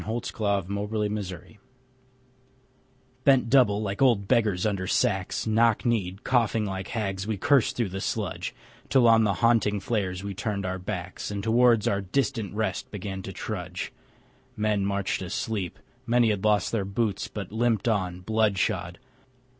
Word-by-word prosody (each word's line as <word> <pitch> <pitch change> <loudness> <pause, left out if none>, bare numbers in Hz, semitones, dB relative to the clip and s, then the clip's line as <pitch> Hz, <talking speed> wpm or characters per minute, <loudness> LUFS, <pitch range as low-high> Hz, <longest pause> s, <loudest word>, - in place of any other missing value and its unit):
Dulce 115 +2 -3
et - - -9
Decorum 105 +1 -1
est 95 +1 -8 1.7
Bent 135 -4 +4
double, 110 -6 +4
like 100 +2 -3
old 115 -7 +4
beggars 105 -5 +2
under 100 -3 -1
sacks, 95 -1 0
Knock 115 +1 +3
kneed, 105 -3 -1
coughing 115 -3 +2
like 95 -1 -4
hags, 100 -3 -3
we 110 -2 -1
cursed 135 +3 +3
through 115 -6 -1
sludge, 100 -3 -3 0.3
Till 130 -3 +5
on 115 -1 +6
the 100 -2 +1
haunting 105 -3 +3
flares 95 -4 -2
we 100 -1 -4
turned 105 -5 -3
our 95 0 -3
backs, 90 -1 -5
And 100 -1 -4
towards 115 -1 +4
our 100 0 +1
distant 110 +1 -1
rest 110 -3 -2
began 95 -2 -5
to 95 - -7
trudge. 90 -2 -5 0.6
Men 105 -2 +1
marched 100 -1 -1
asleep. 95 0 -3 0.3
Many 120 -1 +4
had 100 -2 -2
lost 105 -1 +2
their 115 -4 0
boots, 100 +1 -1
But 100 -3 -7
limped 115 -1 +1
on, 90 -5 0
blood 110 0 +1
shod. 90 -1 -1
105 Hz, 155 wpm, -26 LUFS, 95-115 Hz, 1.7 s, on